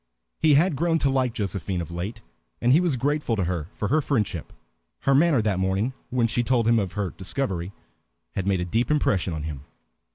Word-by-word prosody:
He 155 -2 +5
had 165 +2 +3
grown 165 +3 +2
to 140 -4 +1
like 130 -2 +1
Josephine 95 -4 -3
of 85 0 -5
late, 100 +6 -5 0.4
and 120 - +3
he 155 - +6
was 175 -6 +1
grateful 145 -1 0
to 95 - 0
her 85 -3 -2
for 100 - -3
her 155 +5 +3
friendship. 105 - -1 0.5
Her 135 - +3
manner 145 -4 +4
that 100 -4 0
morning, 95 +7 0 0.2
when 125 -2 +1
she 115 +1 +1
told 120 -1 +1
him 115 -1 +4
of 95 -3 -3
her 100 -3 -2
discovery, 95 -4 -3 0.6
had 95 0 -3
made 95 -2 +2
a - - -1
deep 115 +7 0
impression 100 -11 +1
on 80 -2 -4
him. 75 -3 -6
110 Hz, 205 wpm, -25 LUFS, 95-135 Hz, 0.6 s, he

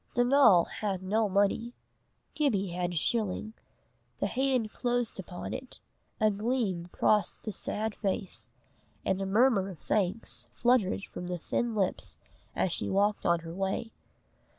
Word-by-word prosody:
Donal 245 -8 +6
had 195 -3 -3
no 210 +3 +1
money. 205 +5 +1 0.6
Gibbie 215 -11 +1
had 175 0 -2
a - - -6
shilling. 215 +4 0 0.6
The - - -1
hand 255 -4 0
closed 245 -3 -1
upon 180 -1 -6
it, 260 0 -7 0.4
a 215 -1 +4
gleam 205 -5 -1
crossed 210 -1 +2
the 215 - -3
sad 215 +2 -3
face, 195 -2 -3 0.6
and 190 0 +1
a 195 - -1
murmur 205 -1 +3
of 185 - -8
thanks 190 +8 -1
fluttered 240 -6 +2
from 180 - -7
the 180 0 -2
thin 230 +7 -1
lips 195 -3 -1 0.4
as 185 - +1
she - - -1
walked 205 +1 +2
on 170 -1 +3
her 165 0 -7
way. 195 +4 -2
205 Hz, 145 wpm, -30 LUFS, 190-235 Hz, 0.6 s, Donal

